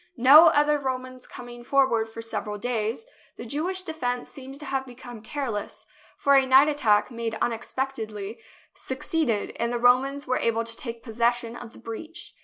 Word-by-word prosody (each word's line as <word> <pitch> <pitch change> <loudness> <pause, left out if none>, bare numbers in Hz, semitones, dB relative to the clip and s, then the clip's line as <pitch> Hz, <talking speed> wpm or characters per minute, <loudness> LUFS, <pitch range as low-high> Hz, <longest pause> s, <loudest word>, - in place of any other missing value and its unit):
No 285 +7 +9
other 295 -1 +3
Romans 255 -1 -5
coming 240 -1 -10
forward 240 -4 +2
for 230 +1 -8
several 210 -2 -4
days, 230 - -2 0.3
the - - -7
Jewish 350 +9 -3
defence 250 -8 -3
seems 270 0 -10
to 300 - -8
have 270 -1 -1
become 245 -2 -10
careless, 230 -3 -5 0.3
for 280 0 +4
a 270 - +6
night 265 +2 +6
attack, 235 -7 +2
made 230 -2 -4
unexpectedly, 225 -3 -3 0.3
succeeded, 260 -4 -2
and 235 0 0
the 240 - -1
Romans 260 +4 +3
were 255 - 0
able 230 0 +1
to 230 0 -5
take 230 -2 -6
possession 235 0 0
of 235 -2 -10
the - - -14
breach. 310 +10 -8
245 Hz, 165 wpm, -25 LUFS, 230-275 Hz, 0.3 s, No